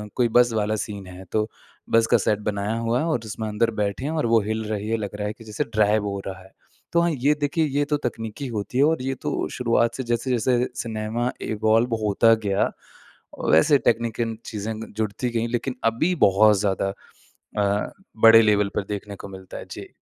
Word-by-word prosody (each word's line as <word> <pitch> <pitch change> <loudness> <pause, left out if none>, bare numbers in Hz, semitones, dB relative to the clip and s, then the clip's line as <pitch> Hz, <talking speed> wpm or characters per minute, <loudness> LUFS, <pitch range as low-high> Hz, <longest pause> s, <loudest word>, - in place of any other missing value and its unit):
कोई 125 -2 +3
बस 120 -1 +5
वाला 110 0 0
सीन 100 -3 -8
है 90 +1 -10
तो 110 0 +1 0.4
बस 115 0 +4
का - - +7
सेट 105 -1 0
बनाया 100 +1 -2
हुआ 115 +2 0
है 160 - 0
और 155 -7 0
उसमें 110 0 -5
अंदर 115 +2 +1
बैठे 100 +5 -2
हैं 155 - -1
और 160 -4 0
वो 115 -1 +4
हिल 110 +2 -2
रही 105 -1 -3
है 115 - +1
लग 105 -2 -5
रहा 105 0 -3
है 105 - -3
कि 115 - -15
जैसे 105 -1 -3
ड्राइव 105 0 +1
हो 100 -1 -3
रहा 95 0 -6
है। 95 - -18 0.4
तो 170 - +4
हाँ 170 -1 +2
ये 145 +1 +2
देखिए 155 +2 +1
ये 145 0 0
तो 150 0 0
तकनीकी 115 +4 -5
होती 115 +1 -4
है 140 - +5
और 160 -3 +2
ये 135 +1 -1
तो - - -2
शुरुआत 115 -1 +1
से 130 - -3
जैसे-जैसे 120 +1 +1
सिनेमा 115 +2 -2
इवॉल्व 110 +2 +1
होता 115 +3 +4
गया 100 -1 +1 0.8
वैसे 80 - +6
टेक्निकल 115 -1 0
चीज़े 110 0 -4
ग 110 +1 -8
जुड़ती 110 +3 -1
गई 115 0 -1
लेकिन 125 +2 -2
अभी 115 +11 +2
बहुत 105 +2 +5
ज़्यादा 100 -1 0 0.6
अ, 100 0 0 0.3
बड़े 115 0 +9
लेवल 105 -2 +3
पर - - 0
देखने 100 0 -5
को 100 - -9
मिलता 95 -1 -10
है। - - -8
जी। - - -8
110 Hz, 205 wpm, -24 LUFS, 105-120 Hz, 0.8 s, बड़े